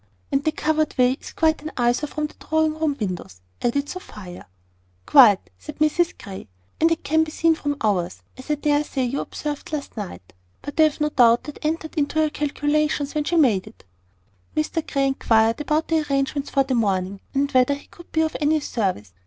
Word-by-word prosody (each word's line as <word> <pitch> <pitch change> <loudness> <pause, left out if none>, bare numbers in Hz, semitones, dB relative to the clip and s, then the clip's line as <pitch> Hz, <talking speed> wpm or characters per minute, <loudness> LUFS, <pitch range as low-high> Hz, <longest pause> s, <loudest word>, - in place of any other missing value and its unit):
"And 275 +1 +1
the 310 - +2
covered 310 -1 0
way 250 0 +5
is - - -9
quite 320 -1 +1
an 310 - -6
eyesore 245 +4 +1
from 305 +1 -2
the 300 - -7
drawing 315 0 +1
room 310 -2 -1
windows," 180 - -4 0.2
added 280 +4 0
Sophia. 205 - -9 0.6
"Quite," 200 - +6
said 300 -1 -9
Mrs 320 +3 +1
Grey; 190 - -9 0.3
"and 325 - +4
it 330 - -1
can 320 +2 +3
be 315 - -5
seen 330 +1 +2
from 290 -2 -3
ours, 185 -5 -1
as 260 +3 -12
I 300 - +2
dare 295 0 +1
say 270 -3 -2
you 255 +3 -1
observed 295 0 -5
last 300 -2 -4
night. 180 - -8 0.3
But 290 +2 -7
I 315 - +8
have 305 0 -1
no 300 - +2
doubt 240 -4 +4
that 295 - -9
entered 315 +1 -2
into 295 0 -1
her 310 -1 +2
calculations 295 0 0
when 300 -1 -1
she 345 - 0
had 320 -3 +6
it - - +6
made." 210 0 -3 0.7
Mr 310 +1 -1
Grey 275 -1 +2
inquired 230 -2 +2
about 305 +2 0
the 325 -1 +3
arrangements 275 +1 -1
for 275 - +2
the 265 -1 -2
morning, 195 -4 0
and 280 +1 +1
whether 255 +2 +3
he 285 - -13
could 345 - -16
be 320 - +2
of 315 -1 -1
any 305 +1 +3
service. 185 - -2
290 Hz, 205 wpm, -23 LUFS, 240-310 Hz, 0.7 s, I